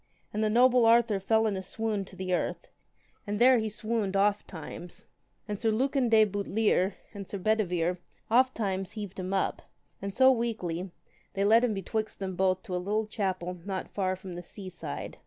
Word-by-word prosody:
And 215 +1 0
the 215 - +2
noble 245 +1 +5
Arthur 230 -3 +4
fell 220 +3 +2
in 210 -2 0
a 190 - -3
swoon 210 0 -2
to 190 - -14
the 185 -1 -3
earth, - - -2 0.6
and 205 0 -1
there 250 +2 +6
he 220 -1 -1
swooned 215 -2 -2
oft 200 +1 +2
times. 175 +5 -9 0.4
And 205 -2 -4
Sir 225 - +1
Lucan 260 +3 +1
de 220 -1 +6
Butlere 205 -1 +1 0.2
and 200 -2 -7
Sir 200 - -4
Bedivere 180 -4 0 0.3
oft 255 +3 +3
times 195 -2 -2
heaved 205 -3 -6
him 185 0 -4
up, 195 -1 0 0.4
and 200 0 -3
so 260 +5 +6
weakly 195 -7 -2 0.5
they 195 0 +1
led 225 +3 +6
him 230 -4 +1
betwixt 215 +3 -3
them 190 -2 -4
both 185 0 +1
to 190 -6 -4
a 180 - -1
little 210 +4 0
chapel 185 -4 -3
not 190 -1 -5
far 185 -2 0
from 185 -1 -9
the 175 - -6
sea 185 +2 -9
side. 165 - -7
205 Hz, 195 wpm, -29 LUFS, 185-225 Hz, 0.6 s, there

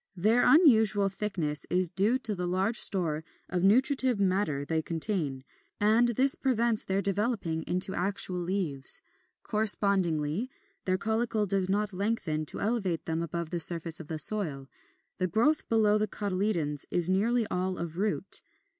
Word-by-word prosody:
Their 215 +7 +2
unusual 220 - +4
thickness 180 -8 -3
is 180 0 +2
due 200 +8 +1
to 225 -4 -2
the 180 -2 -4
large 190 +6 0
store 160 -6 -1 0.2
of 180 -1 -2
nutritive 255 +3 +2
matter 185 -7 0
they 160 +1 -1
contain, 160 -5 -2 0.4
and 220 +3 +3
this 260 +4 +3
prevents 235 -4 +1
their 195 +1 -1
developing 200 -5 -2
into 185 +2 +1
actual 185 -1 -1
leaves. 170 -7 +1 0.4
Correspondingly, 200 -3 0 0.4
their 185 0 +1
caulicle 220 0 -1
does 190 -1 -1
not 205 +1 -1
lengthen 185 -6 -2
to - - -4
elevate 200 -7 -2
them 160 0 -2
above 170 0 -5
the 175 - -2
surface 165 -1 +3
of 160 - -10
the 160 - -4
soil; 155 -7 +1 0.5
the 185 - 0
growth 240 - 0
below 215 -2 +3
the 215 - 0
cotyledons 185 -9 -2
is 175 -1 +2
nearly 220 +5 +1
all 185 +1 -2
of 170 0 -6
root. 205 -1 +1
195 Hz, 150 wpm, -28 LUFS, 170-215 Hz, 0.5 s, unusual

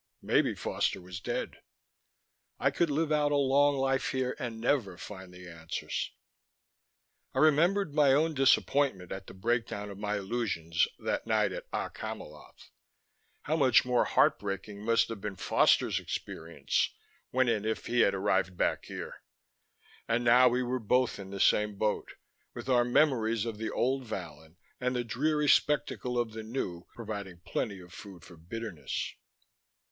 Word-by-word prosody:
Maybe - - +2
Foster - - -1
was 90 0 -8
dead. - - -4 1.0
I - - +2
could 170 - +1
live 155 +2 0
out 150 -1 +2
a - - +3
long 140 +1 +4
life 135 0 +1
here 130 -1 -1
and 115 -2 -4
never 115 -7 0
find 95 -2 -9
the 90 0 -12
answers. 80 -2 -4 1.3
I - - -3
remembered 155 +4 +3
my 145 -2 +5
own 155 +4 +3
disappointment 135 - +2
at 95 - -6
the - - -11
breakdown 105 -1 -2
of 100 - -10
my 105 0 -1
illusions 95 -6 0
that - - -3
night - - +2
at - - -7
Okk - - -4
Hamiloth. - - -9 0.7
How 155 - 0
much 130 -8 +5
more 125 -1 +2
heartbreaking 100 +1 0
must 115 +1 +3
have 115 -3 -6
been 105 -1 -4
Foster's - - +3
experience 80 +1 -2 0.4
when 130 0 +2
and 110 -3 +1
if 110 0 -2
he 120 +1 0
had 100 -4 +4
arrived 95 -2 0
back - - 0
here. - - -7 0.9
And 115 +1 +1
now 125 +2 +6
we 125 +1 0
were 125 +1 -1
both 125 0 +1
in 95 -1 -8
the 100 0 -6
same 105 +1 +3
boat: 105 +1 -1 0.4
with - - -7
our 125 -2 +5
memories 120 -4 +2
of 110 -2 -5
the 110 - -2
old 130 +1 0
Vallon 80 -6 -8 0.2
and 125 0 -1
the 120 - 0
dreary 150 +6 0
spectacle 135 -4 +2
of 120 -2 0
the 110 0 -6
new 110 -7 -4
providing 100 -6 -6
plenty 100 +1 -2
of 90 -1 -14
food 95 -4 -11
for 85 - -13
bitterness. 90 +1 -5
115 Hz, 160 wpm, -30 LUFS, 95-130 Hz, 1.3 s, now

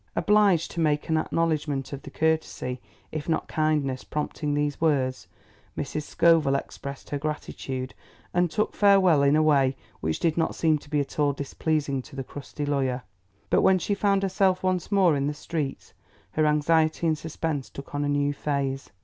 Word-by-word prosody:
Obliged 205 -6 +3
to 175 - -5
make 150 -1 +1
acknowledgment 155 -4 0
of 140 - -6
the - - -10
courtesy 155 -5 -1 0.3
if 155 +1 -5
not 160 - 0
kindness 150 -4 0
prompting 150 0 -3
these 145 0 -1
words, 130 - +1 0.5
Mrs. 150 - -3
Scoville 160 -2 +3
expressed 140 0 -6
her 145 - -1
gratitude 135 -3 -4 0.4
and 175 0 +2
took 215 - -1
farewell 195 -7 +5
in 140 +1 +4
a 155 - +4
way 135 -3 +3 0.2
which 80 0 -2
did 165 -1 +1
not 165 - 0
seem 155 -2 +2
to 145 - -17
be 150 -1 +1
at 140 +2 -6
all 145 -1 +3
displeasing 140 0 -1
to 130 - -14
the 135 - -3
crusty 145 +2 -6
lawyer; 135 -3 0 0.5
but - - +4
when 190 - +5
she 195 +3 -1
found 200 -1 +1
herself 190 -1 +2
once 185 +1 0
more 190 -6 +4
in 140 0 0
the 150 - -2
streets, 150 -2 -4 0.4
her 155 0 +2
anxiety 155 +2 +2
and 155 -2 +1
suspense 155 -3 -3
took 140 - -10
on 145 0 -1
a 145 - 0
new 145 0 +1
phase. 140 -2 -2
150 Hz, 175 wpm, -26 LUFS, 140-165 Hz, 0.5 s, farewell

